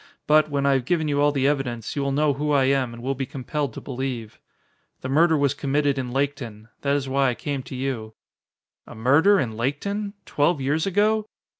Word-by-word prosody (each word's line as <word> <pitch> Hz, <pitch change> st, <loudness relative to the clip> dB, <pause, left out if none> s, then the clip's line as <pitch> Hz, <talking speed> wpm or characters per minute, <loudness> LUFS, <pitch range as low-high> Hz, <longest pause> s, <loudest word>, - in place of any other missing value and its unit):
But, 155 Hz, 0 st, +4 dB
when 140 Hz, -1 st, -1 dB
I 140 Hz, -, +4 dB
have 130 Hz, -3 st, 0 dB
given 165 Hz, -1 st, +1 dB
you 145 Hz, -1 st, +1 dB
all 145 Hz, 0 st, +4 dB
the 135 Hz, -2 st, 0 dB
evidence, 130 Hz, -6 st, -1 dB
you 140 Hz, -, -1 dB
will 140 Hz, 0 st, 0 dB
know 145 Hz, +1 st, +2 dB
who 150 Hz, +2 st, -2 dB
I 140 Hz, -2 st, +4 dB
am 130 Hz, -2 st, +1 dB
and 120 Hz, 0 st, -10 dB
will 135 Hz, +2 st, 0 dB
be 135 Hz, -1 st, -4 dB
compelled 140 Hz, +1 st, -3 dB
to -, -, -6 dB
believe. 125 Hz, -4 st, -5 dB, 0.6 s
The 130 Hz, -, -5 dB
murder 160 Hz, +3 st, +4 dB
was 140 Hz, -1 st, +2 dB
committed 140 Hz, 0 st, 0 dB
in 125 Hz, -2 st, -4 dB
Laketon. 125 Hz, -6 st, -3 dB
That 140 Hz, 0 st, +1 dB
is 140 Hz, -2 st, -1 dB
why 135 Hz, 0 st, +2 dB
I 120 Hz, -, -2 dB
came 140 Hz, +1 st, -3 dB
to 130 Hz, +1 st, -9 dB
you." 125 Hz, -5 st, -4 dB, 0.7 s
"A -, -, -10 dB
murder 150 Hz, -, +4 dB
in 110 Hz, -4 st, -2 dB
Laketon? 200 Hz, -, -2 dB
Twelve 150 Hz, +2 st, +1 dB
years 145 Hz, +6 st, 0 dB
ago?" 210 Hz, +3 st, +2 dB
140 Hz, 210 wpm, -24 LUFS, 130-150 Hz, 0.7 s, But